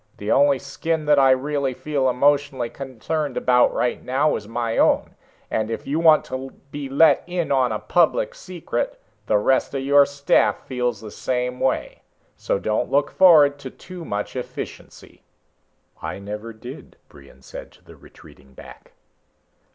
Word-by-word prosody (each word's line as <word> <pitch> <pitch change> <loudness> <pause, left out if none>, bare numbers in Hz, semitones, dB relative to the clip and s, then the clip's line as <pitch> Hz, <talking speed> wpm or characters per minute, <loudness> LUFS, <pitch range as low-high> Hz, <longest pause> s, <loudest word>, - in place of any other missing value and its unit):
The 105 - -3
only 140 0 +4
skin 155 +4 -3
that 150 -1 +4
I 135 -1 +5
really 135 0 0
feel 140 -3 -1
emotionally 140 -2 +1
concerned 140 +3 -4
about 125 -1 +3
right 125 - -2
now 140 +4 +1
is 105 - -7
my 115 0 -3
own. - - +2 0.4
And 110 0 -1
if 115 - -5
you 145 +4 -1
want 160 -2 +5
to 130 +1 -7
be 145 -2 -6
let 150 +4 +4
in 175 -3 -2
on 130 -3 +2
a 110 - -1
public - - +1
secret - - -5 0.3
the 105 - +3
rest 130 +6 +1
of 135 - -2
your 140 +1 +5
staff 140 0 +1
feels 125 -4 -2
the 110 -1 -9
same 125 +1 -3
way. 130 - -2 0.3
So - - -2
don't 110 +4 -1
look 140 +1 +1
forward 150 -6 +5
to 135 - -7
too 180 +5 -11
much 105 -6 -4
efficiency." 125 - -8 0.8
"I - - -5
never 105 +3 -7
did," 120 +6 -11
Brion 70 -1 -18
said - - -10
to - - -24
the - - -15
retreating 65 -1 -18
back. - - -14
135 Hz, 160 wpm, -22 LUFS, 120-145 Hz, 0.8 s, I